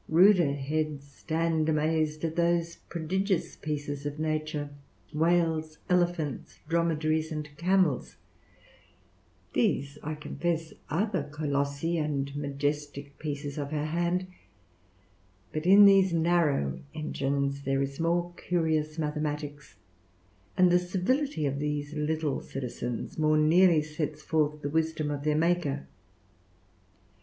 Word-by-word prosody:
Ruder 175 -3 +6
heads 145 +1 -2
stand 160 +2 -1
amazed 155 0 +1
at 160 0 -3
those 170 -1 +1
prodigious 185 +3 -1
pieces 145 -2 -4
of 145 0 -4
nature 155 -1 -2 0.4
whales, 160 -1 +1
elephants, 175 -5 0
dromedaries, 160 -1 +1
and 150 -1 -4
camels; 175 -3 +1 1.4
these, 140 +2 0
I 155 +1 -4
confess, 165 +2 -3 0.2
are 170 +8 +1
the 185 -9 -2
colossi 145 +2 -1
and 140 -2 -2
majestic 145 0 -3
pieces 145 -1 -4
of 140 -1 -3
her 150 0 -2
hand: 175 +3 0 1.3
but 155 +2 -2
in 200 +2 +9
these 195 -2 +6
narrow 160 - +2 0.2
engines 140 -2 -1
there 135 0 0
is 140 +1 -5
more 170 +1 0
curious 160 -3 0
mathematics; 150 -1 -3 0.8
and 180 -1 +6
the 180 - +5
civility 185 - 0
of 140 0 -1
these 150 0 -2
little 150 -1 -1
citizens 125 0 -5
more 155 0 +3
neatly 165 +1 +5
sets 150 0 -4
forth 150 -1 0
the 145 - -1
wisdom 160 -1 0
of 145 -1 -4
their 150 0 +2
Maker. 160 -4 +1
155 Hz, 115 wpm, -29 LUFS, 145-170 Hz, 1.4 s, in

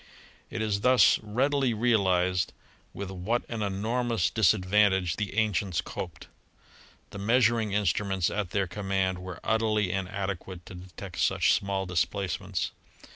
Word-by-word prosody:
It 110 - -3
is 100 -2 -1
thus 125 +2 +5
readily 130 +3 +1
realized 95 -6 +2 0.4
with 100 -1 -6
what 95 +6 -2
an 115 -2 -4
enormous 110 -3 0
dis 110 -1 +4
advantage 95 -2 +2
the 105 -1 -4
ancients 100 -5 +1
coped. - - -6 0.9
The 100 - -7
measuring 115 0 +2
instruments 95 -2 +1
at 105 -4 -2
their 100 +1 0
command 95 0 -1
were 90 -2 -8
utterly 110 -3 +1
inadequate 95 -1 -4
to - - -10
detect 90 +1 -9
such - - +3
small 100 -1 -1
displacements. 90 0 -2
100 Hz, 130 wpm, -28 LUFS, 95-110 Hz, 0.9 s, thus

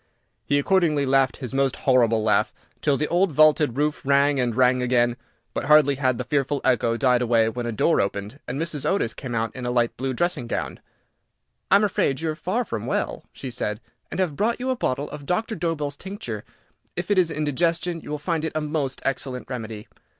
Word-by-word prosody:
He 145 - +3
accordingly 155 -2 +2
laughed 135 -1 +2
his 130 -2 -6
most 135 -1 +1
horrible 115 -4 +3
laugh, 110 - +2 0.3
till 145 -2 +2
the 150 - -1
old 180 +1 +2
vaulted 150 -3 +4
roof 150 +1 0
rang 140 +1 +3
and 120 -3 0
rang 125 0 +3
again, 120 -1 +2 0.4
but - - -3
hardly 150 -1 +6
had 130 -3 0
the - - -2
fearful 145 -1 0
echo 120 -2 +2
died 125 -1 +3
away 115 -2 +3
when 120 +1 -4
a - - -1
door 140 +9 +2
opened, 100 +6 -4
and 125 +3 -3
Mrs. 160 -3 -2
Otis 190 - 0
came 125 -4 -6
out 115 -1 -2
in 130 - -6
a 120 - -1
light 120 -1 +1
blue 130 0 -2
dressing 175 -5 -1
gown. - - -3 0.9
"I - - +6
am 200 - +5
afraid 140 -9 +1
you 160 0 -1
are - - -5
far 190 +10 -1
from 110 - -4
well," - - -2
she 130 - -7
said, 105 -3 -3 0.3
"and - - -5
have 175 -6 0
brought 230 - 0
you 260 +1 -1
a - - 0
bottle 140 - -1
of 145 -1 -8
Doctor 220 +6 0
Dobell's 155 -4 -2
tincture. 165 - -6 0.5
If - - -3
it 200 - +4
is 175 -3 +3
indigestion, 165 +3 0
you - - -11
will 150 - -2
find 160 +1 -2
it 160 - -2
a - - +1
most 150 -3 -2
excellent 130 -1 -3
remedy." 110 -3 -6
140 Hz, 210 wpm, -24 LUFS, 125-160 Hz, 0.9 s, hardly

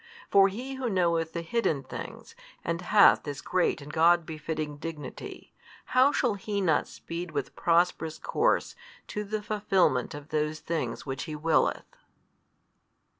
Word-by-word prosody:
For 195 -1 +7
He 245 +8 -5
Who 260 -2 -2
knoweth 170 -4 +1
the 170 - -3
hidden 165 - 0
things, - - -8 0.3
and 170 +1 -1
hath 200 +3 +6
this 145 -1 -6
great 180 -4 0
and 145 +2 -10
God 170 +1 +4
befitting 155 -1 -4
dignity, 155 -1 -8 0.3
how 260 +3 +4
shall 245 -6 +1
He 200 +1 -3
not 165 -6 +2
speed 170 +1 -6
with 145 -4 -4
prosperous 170 -2 +1
course - - 0 0.3
to 210 - -3
the 210 +1 -4
fulfilment 195 - +1
of 145 +1 -10
those 155 0 -1
things 165 -1 -3
which 135 -1 -4
He 155 -2 -5
willeth? 155 +1 +1
170 Hz, 145 wpm, -28 LUFS, 155-200 Hz, 0.3 s, For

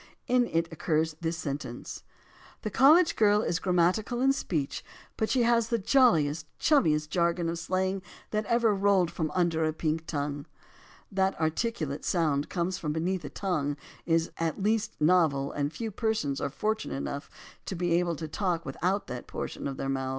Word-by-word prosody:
In 245 -1 +3
it 165 0 0
occurs 160 0 0
this 165 0 -1
sentence: 140 -6 -5 0.6
"The 215 - -3
college 315 - +6
girl 210 0 +4
is 170 - 0
grammatical 185 +6 +1
in 270 +2 +4
speech, 155 - -2 0.3
but 220 - -1
she 255 -2 +3
has 235 -1 +3
the 235 - +2
j 230 +6 +2
oiliest, 155 - +3
chummiest 155 - +3
jargon 170 0 +1
of 165 0 -2
slang 185 +2 -1 0.3
that 215 0 0
ever 235 -2 +3
rolled 195 -3 +3
from 160 -2 -2
under 170 -3 +2
a 155 - +2
pink 160 0 -2
tongue." 145 -1 -3 0.6
That 190 -3 0
articulate 160 - -1
sounds 155 -5 +1
come 175 0 -1
from 165 -5 -3
beneath 175 +3 -1
the 145 - -7
tongue 145 -4 -2 0.3
is 165 0 +2
at 165 +3 -2
least 215 0 0
novel 150 -4 +3
and 145 0 -2
few 225 +4 -4
persons 205 - -1
are - - -1
fortunate 215 +10 -2
enough 140 +1 -4 0.4
to 190 - -3
be 175 0 -1
able 170 -1 +1
to 160 +1 -5
talk 170 0 -1
with 135 - -6
that 180 -9 -1
portion - - -5
of 135 -1 -5
their 135 - -3
mouths. 135 -1 -1
170 Hz, 175 wpm, -28 LUFS, 155-205 Hz, 0.6 s, college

